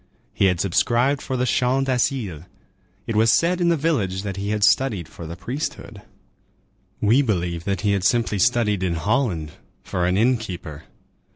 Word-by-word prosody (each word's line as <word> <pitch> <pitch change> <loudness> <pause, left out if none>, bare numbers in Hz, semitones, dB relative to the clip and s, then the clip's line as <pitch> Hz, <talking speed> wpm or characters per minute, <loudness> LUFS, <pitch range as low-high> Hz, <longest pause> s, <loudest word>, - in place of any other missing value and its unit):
He - - +2
had 90 -3 +2
subscribed 120 +9 +1
for 130 - -3
the 125 - 0
Champ 130 +3 +1
d'Asile. 120 - -1 0.6
It 115 - -3
was 110 +1 +4
said 175 +5 +2
in 170 - +3
the 170 - +2
village 105 - -1
that 100 -2 -4
he 100 +1 -4
had 105 -1 -1
studied 105 - +2
for 85 0 -10
the 85 - -7
priesthood. 135 - -6 1.0
We 115 +7 +4
believe 90 -8 -2
that 100 -2 -1
he 105 - +1
had 100 -2 0
simply 115 -1 +1
studied 115 -4 +2
in 90 -2 0
Holland 95 - -1 0.3
for 90 -1 -1
an 90 +1 +1
inn 125 +4 +3
keeper. 85 -8 -8
105 Hz, 175 wpm, -22 LUFS, 90-125 Hz, 1.0 s, was